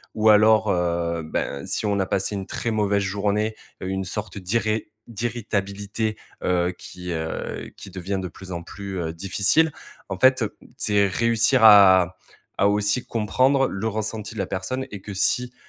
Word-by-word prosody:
ou 110 0 +4
alors, 110 0 +5
heu, 85 -1 0
ben, 70 -2 -3
si - - -1
on 100 - +1
a 95 - +1
passé 100 +2 -1
une 95 - -4
très 115 - -3
mauvaise 100 -2 +1
journée, 105 +3 -1 0.3
heu, 95 - -3
une 95 0 -2
sorte 105 +2 -5
d'irré 110 +3 -1 0.2
d'irritabilité, 110 -2 -3 0.3
heu, 90 0 +1
qui, 90 -1 -8
heu 80 -1 -4
qui - - -10
devient 95 +1 -3
de 95 - -4
plus 95 +2 -11
en 85 - -4
plus, 95 0 -7
heu, 80 -1 -3
difficile. 100 - +2 0.4
En 95 - -3
fait, 130 0 +5 0.3
c'est 100 -1 +2
réussir 115 +3 +2
à 95 -4 +7 0.4
à 100 - +4
aussi 105 +3 +1
comprendre 130 +5 +2
le 100 +3 -3
ressenti 110 0 -4
de - - -6
la 95 - 0
personne 130 +8 -3
et 100 - -7
que 100 - -8
si, 125 +5 +1
100 Hz, 170 wpm, -23 LUFS, 95-110 Hz, 0.4 s, à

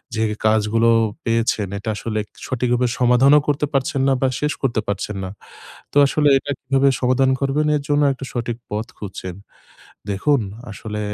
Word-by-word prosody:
যে 110 - 0 0.2
কাজগুলো 110 +1 +3 0.4
পেয়েছেন 115 -3 +1
এটা 110 +3 -5
আসলে 110 0 -3 0.3
সঠিকভাবে 125 0 +1
সমাধানও 125 +4 +5
করতে 145 0 +1
পারছেন 135 0 0
না। 135 - +4
বা 135 - +3
শেষ 150 0 0
করতে 120 -5 0
পারছেন 100 +1 -3
না। 95 - -4 0.6
তো - - -14
আসলে 150 +1 +2
এটা 145 - -7
কিভাবে 135 +1 +2
সমাধান 130 +1 +3
করবেন 145 +2 +1
এর 145 - -2
জন্য 145 0 +2
একটা 135 0 -7
সঠিক 120 -1 -3
পথ 105 +2 -3
খুঁজছেন। 95 -3 -7 0.8
দেখুন 140 +8 +2 0.3
আসলে 105 +1 -6
125 Hz, 155 wpm, -21 LUFS, 110-135 Hz, 0.8 s, সমাধানও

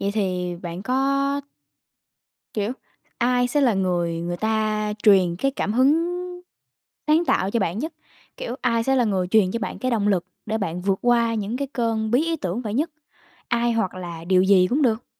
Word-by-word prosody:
vậy 200 - 0
thì 180 -4 -1
bạn 175 +2 -5
có 275 +2 +1 1.1
kiểu, 215 +2 -1 0.5
ai 245 0 +2
sẽ 290 +3 +1
là 245 -6 +3
người 175 -3 0
người 175 +1 -3
ta 215 0 0
truyền 185 -5 +5
cái 275 +8 0
cảm 210 -6 -2
hứng 300 +8 +3 1.0
sáng 315 +3 +4
tạo 190 - +1
cho 230 +1 0
bạn 185 +1 -1
nhất? 315 +6 -3 0.4
Kiểu, 245 +2 -5
ai 230 -2 +1
sẽ 270 0 +2
là 245 - +3
người 190 -4 0
truyền 200 -2 +4
cho 230 - -2
bạn - - -4
cái 255 - -1
động 210 -3 +1
lực 180 -4 +1 0.2
để 220 +1 -1
bạn 180 -3 -3
vượt 195 0 +1
qua 235 -1 +3
những 215 +3 -2
cái 280 0 -3
cơn 225 -2 -1
bí 260 +7 +3
ý 330 0 -1
tưởng 195 - -3
vậy 215 -1 -4
nhất? 310 +6 0 0.6
Ai 235 0 +1
hoặc 205 -5 -1
là 170 -2 -7
điều 185 +1 +4
gì 190 -1 +5
cũng 275 +10 +1
được? 230 -2 +1
220 Hz, 195 wpm, -23 LUFS, 190-250 Hz, 1.1 s, truyền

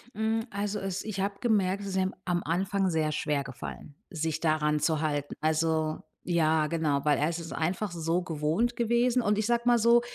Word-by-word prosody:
Hm, 220 +1 0
also 205 +1 -2
es 195 -1 -3
ich 205 -3 -3
habe 200 +1 -1
gemerkt, 200 -4 +1
es 200 - -5
ist 190 - -4
ihm 190 0 +1
am 175 -1 0
Anfang 190 +3 0
sehr 155 -2 +1
schwer 150 -2 0
gefallen, 135 +2 -8
sich 160 -3 -2
daran 150 -2 +2
zu 155 0 +1
halten. 145 -2 -1
Also 155 0 +1 0.2
ja, 160 -3 +2
genau, 155 -4 0
weil 150 -1 +4
er 150 +3 +1
ist 170 - -3
es 165 -1 -7
einfach 180 +5 -1
so 165 +1 0
gewohnt 165 +8 0
gewesen. 235 +2 +2
Und 210 -2 +1
ich 215 - 0
sage 235 0 +1
mal 240 -1 +5
so, 235 +2 +5
175 Hz, 200 wpm, -28 LUFS, 155-205 Hz, 0.2 s, mal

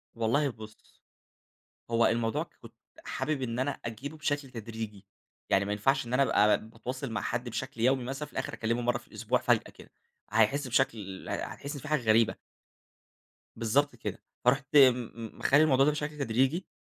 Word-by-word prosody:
والله 120 +6 +2
بُص، 110 -3 -13 0.9
هو 115 0 +4
الموضوع 115 -1 +1 0.2
كُنت - - -13 0.3
حابب 150 -3 -2
إن 115 -1 -2
أنا 130 +3 +1
أجيبه 125 +7 -6
بشكل 145 -3 -2
تدريجي، 110 -3 -7 0.4
يعني 95 - +4
ما 100 - -2
ينفعش 135 +6 +1
إن 120 - -6
أنا 135 - +4
ابقي 105 -5 +4
باتواصل 125 +3 -5
مع 110 - -2
حد 125 0 -2
بشكل 130 +1 -5
يومي 130 +1 +3
مثلًا 135 +4 -4
في - - -20
الآخر - - -3
أكلمه 115 +2 -1
مرّة 120 0 +1
في 120 - -20
الأسبوع - - 0
فجأة - - +4
كده، - - -16 0.4
هيحس 115 +6 +2
بشكل 110 -7 -1
هتحس 140 +2 -4
إن 145 - -6
في 155 - -8
حاجة 155 -2 +2
غريبة. 110 0 +3 1.2
بالضبط 140 +6 +1
كده، - - -6 0.2
فرُحت 135 +2 +2
م 125 -4 +6 0.3
مخلي 145 +3 +5
الموضوع 135 -3 +4
ده 150 - +4
بشكل 150 0 -4
تدريجي 135 +6 +1
125 Hz, 170 wpm, -29 LUFS, 115-140 Hz, 1.2 s, م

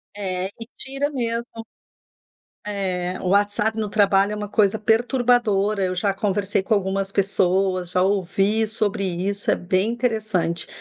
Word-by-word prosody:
É, 185 -2 -2
e 225 +3 -10
tira 275 +2 -2
mesmo. 235 -4 -2 1.2
É, 185 -3 -2
o 185 - -3
WhatsApp 205 +3 +1
no 215 -1 -1
trabalho 200 -1 +3
é - - -3
uma 210 0 -5
coisa 210 0 +2
perturbadora. 220 -3 +2
Eu 185 0 -1
já 195 +2 0
conversei 200 0 0
com 220 +3 +1
algumas 195 0 -1
pessoas, 190 -2 +1
já 180 - +2
ouvi 200 +3 +1
sobre 210 -2 0
isso, 190 +3 -2
é - - +4
bem 185 +4 0
interessante. 215 -9 -1
200 Hz, 145 wpm, -22 LUFS, 190-220 Hz, 1.2 s, é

